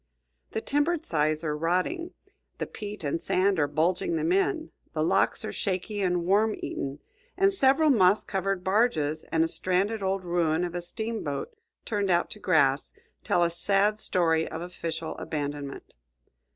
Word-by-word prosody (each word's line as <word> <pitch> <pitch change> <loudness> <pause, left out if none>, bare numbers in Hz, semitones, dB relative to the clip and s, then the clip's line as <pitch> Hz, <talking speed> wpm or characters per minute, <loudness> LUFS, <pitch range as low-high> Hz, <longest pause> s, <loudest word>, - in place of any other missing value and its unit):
The 220 - -1
timbered 300 +5 0
sides 155 0 0
are 150 -2 -1
rotting, 185 - -1 0.4
the - - -2
peat 210 -4 -7
and 145 +3 -1
sand 190 -1 +2
are 145 - +3
bulging 175 - 0
them 330 +1 0
in, 370 -4 +1 0.2
the - - 0
locks - - +2
are - - -3
shaky 200 +2 -2
and 180 -2 +1
worm 210 +4 +3
eaten, 140 0 -4 0.4
and 390 +1 +4
several 295 -2 +4
moss 200 -4 +4
covered 195 -1 -2
barges 185 -7 +1
and 160 0 +3
a - - +1
stranded 190 +6 0
old 190 0 -1
ruin 170 -1 +1
of 175 -1 -3
a 175 - -3
steamboat 220 - -4 0.3
turned 205 -3 -1
out 175 -1 +2
to 210 - -5
grass 140 -8 +2 0.3
tell 175 - +2
a 170 - +1
sad 200 +4 +2
story 165 -5 +1
of 160 - -5
official 165 -2 -5
abandonment. 145 -2 -5
185 Hz, 160 wpm, -27 LUFS, 165-220 Hz, 0.4 s, and